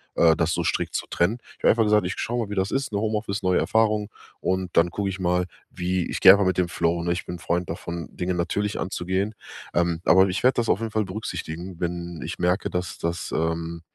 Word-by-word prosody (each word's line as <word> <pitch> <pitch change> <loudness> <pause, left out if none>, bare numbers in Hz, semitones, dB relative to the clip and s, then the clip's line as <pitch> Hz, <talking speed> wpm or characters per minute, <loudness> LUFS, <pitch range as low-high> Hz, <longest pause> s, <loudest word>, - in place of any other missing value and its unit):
äh, 80 -1 +5
das 80 0 +1
so - - -1
strikt - - -1
zu - - -2
trennen. 105 +8 +1 0.2
Ich - - -24
habe - - +6
einfach 115 0 +3
gesagt: 105 -2 +3
Ich 90 - -1
schaue 120 -1 -1
mal, - - -13
wie - - -3
das 95 0 0
ist, 135 -2 -1
ne? 100 - -1
Home 110 0 0
Office, 100 -2 -3
neue 90 0 +3
Erfahrung 110 -2 +2 0.3
und 95 -1 -1
dann 85 +1 +5
gucke 100 +2 -2
ich 95 0 -5
mal, 90 0 +1 0.3
wie 90 0 -1
ich - - -3
gehe 95 - +11
einfach 100 0 +4
mit 95 -1 +1
dem 90 -1 +1
Flow, 85 0 0
ne? 85 - 0
Ich 90 - -2
bin 90 - -5
'n - - -19
Freund 85 +1 -1
davon, 85 0 -5
Dinge 90 +1 -1
natürlich 105 +4 -1
anzugehen. 95 +3 -2 0.4
Ähm, 85 -1 +1
aber 95 +1 +6
ich 95 - -2
werde 130 - +5
das 115 -2 +1
auf 95 - +3
jeden 115 -1 -3
Fall 110 -1 0
berücksichtigen, 95 -3 -6
wenn 85 -1 -4
ich - - -5
merke, 90 +3 +1
dass, 90 0 -3
das 85 +1 -3
ähm, 80 +1 -2
90 Hz, 245 wpm, -25 LUFS, 85-105 Hz, 0.4 s, gehe